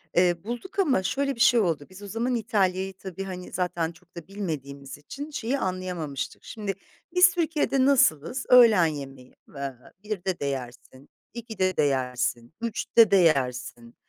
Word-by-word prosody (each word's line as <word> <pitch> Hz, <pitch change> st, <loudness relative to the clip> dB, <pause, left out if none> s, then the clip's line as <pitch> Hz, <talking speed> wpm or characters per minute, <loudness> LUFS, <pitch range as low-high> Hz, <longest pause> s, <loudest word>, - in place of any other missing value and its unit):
Eee, 175 Hz, 0 st, +4 dB
bulduk 240 Hz, -, -6 dB
ama 275 Hz, -, +2 dB
şöyle 275 Hz, +7 st, -1 dB
bir -, -, -15 dB
şey 235 Hz, +1 st, +5 dB
oldu, 165 Hz, -8 st, 0 dB
biz 190 Hz, +2 st, -13 dB
o 205 Hz, -, -7 dB
zaman 235 Hz, +4 st, -1 dB
İtalya'yı 195 Hz, -4 st, 0 dB
tabii, 190 Hz, 0 st, -7 dB
hani, 185 Hz, -2 st, -7 dB
zaten 175 Hz, -2 st, -1 dB
çok 175 Hz, +1 st, -23 dB
da 170 Hz, -2 st, -9 dB
bilmediğimiz 140 Hz, -9 st, -6 dB
için 280 Hz, -, -8 dB
şeyi 265 Hz, -1 st, -2 dB
anlayamamıştık. 180 Hz, -6 st, -4 dB
Şimdi 205 Hz, -3 st, -4 dB, 0.4 s
biz 360 Hz, 0 st, +7 dB
Türkiye'de 310 Hz, -6 st, +1 dB
nasılız? 250 Hz, -, +2 dB
Öğlen 230 Hz, -8 st, +7 dB
yemeği, 135 Hz, -4 st, -6 dB, 0.2 s
eee, 140 Hz, -1 st, -4 dB, 0.3 s
1'de 190 Hz, -4 st, -3 dB
de -, -, -3 dB
yersin, 130 Hz, 0 st, -6 dB, 0.2 s
2'de 215 Hz, -6 st, -2 dB
de -, -, +4 dB
yersin, 125 Hz, -2 st, -1 dB
3'te 230 Hz, -1 st, +3 dB
de 200 Hz, -, +6 dB
yersin, 125 Hz, -8 st, +1 dB
185 Hz, 155 wpm, -26 LUFS, 145-230 Hz, 0.4 s, biz